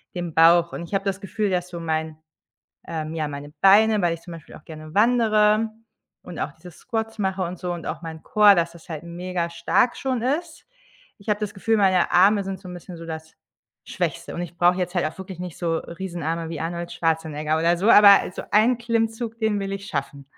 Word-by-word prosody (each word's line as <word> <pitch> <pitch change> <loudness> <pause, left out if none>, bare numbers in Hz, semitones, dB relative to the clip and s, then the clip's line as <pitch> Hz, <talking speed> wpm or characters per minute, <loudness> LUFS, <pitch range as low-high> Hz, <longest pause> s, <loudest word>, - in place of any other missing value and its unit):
den 175 -3 -4
Bauch. 170 +1 +5
Und 170 - -5
ich 185 - -5
habe 195 - -1
das 195 0 -2
Gefühl, 205 +1 -2
dass 180 -1 -1
so 175 -1 -7
mein, 160 -1 -3 0.7
ähm 155 -1 -4
ja, 155 -2 -2
meine 145 0 -8
Beine 210 +2 +6
weil 170 -1 +1
ich 165 - -16
zum 175 - -10
Beispiel 165 -2 -12
auch - - -15
gerne 155 0 -10
wandere 215 -1 +3 0.5
und 180 - -9
auch 150 - -3
diese 175 +3 -13
Squats 225 +5 -5
mache 190 -1 -1
und 180 0 -5
so 180 -1 -3
und 170 -2 -6
auch - - -5
mein 160 -1 -8
Core, 210 -1 +6
dass 170 -1 0
es 170 +1 -16
halt 155 -2 -6
mega 170 0 -4
stark 235 +7 +1
schon 255 -3 -2
ist. 315 +5 -3 0.5
Ich 200 - -9
habe 210 0 +1
das 210 -2 -4
Gefühl, 225 +3 0
meine 190 -3 +3
Arme 200 +3 +5
sind 190 -1 -5
so 190 - -12
'n 180 - -8
bisschen 175 0 -10
so 165 - -9
das 160 -1 -8 0.5
Schwächste, - - -3
und 170 - -3
ich 175 0 -8
brauche 175 +1 +4
jetzt 180 -1 -2
halt 175 - +1
auch 155 - -5
wirklich 190 -2 -9
nicht 180 -3 -7
so 165 -2 -1
riesen 170 +1 -7
Arme 165 +1 -2
wie 165 - -5
Arnold 170 +1 -4
Schwarzenegger 160 -2 -1
oder 170 +2 +2
so, 200 +6 +1
aber 205 -2 +9
also, 180 - -7
1 225 +4 +4
Klimmzug, 230 0 -2
den 220 -2 0
will 195 0 -4
ich 195 0 -5
schaffen. 140 -1 -4
180 Hz, 225 wpm, -23 LUFS, 165-205 Hz, 0.7 s, aber